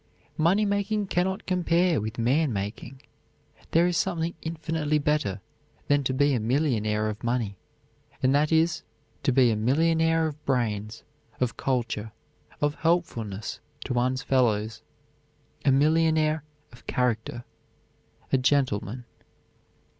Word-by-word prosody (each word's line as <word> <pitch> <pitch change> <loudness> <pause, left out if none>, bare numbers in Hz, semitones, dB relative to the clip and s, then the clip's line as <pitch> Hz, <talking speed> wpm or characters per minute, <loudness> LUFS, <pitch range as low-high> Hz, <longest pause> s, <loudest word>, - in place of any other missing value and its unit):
Money 185 +7 +3
making 200 +1 0
can 180 -1 +1
not 190 +3 -3
compare 175 - +2
with 110 +2 -5
man 135 +6 +2
making. 105 +6 -5 0.7
There 165 +1 +4
is 175 -1 +1
something 170 -2 -1
infinitely 160 -2 -1
better 145 - 0 0.5
than 145 0 +3
to 130 - +1
be 145 +1 +3
a 125 - +1
millionaire 110 -4 0
of 110 +2 -5
money, 115 -4 -1 0.7
and 130 +1 +4
that 150 +2 +2
is 165 +1 +2 0.4
to - - +2
be 125 -2 +4
a - - +1
millionaire 160 +7 +2
of 150 -1 -5
brains, 110 -4 -1 0.4
of 125 -3 0
culture, 115 -4 -2 0.5
of 145 0 +2
helpfulness 115 - -1 0.3
to 130 - -2
one's 125 +1 0
fellows, 110 -4 +1 0.8
a 140 - +4
millionaire 155 +2 +3 0.3
of 120 - -18
character 120 -1 -1 0.9
a 135 - +5
gentleman. 125 -4 0
135 Hz, 125 wpm, -26 LUFS, 115-160 Hz, 0.9 s, a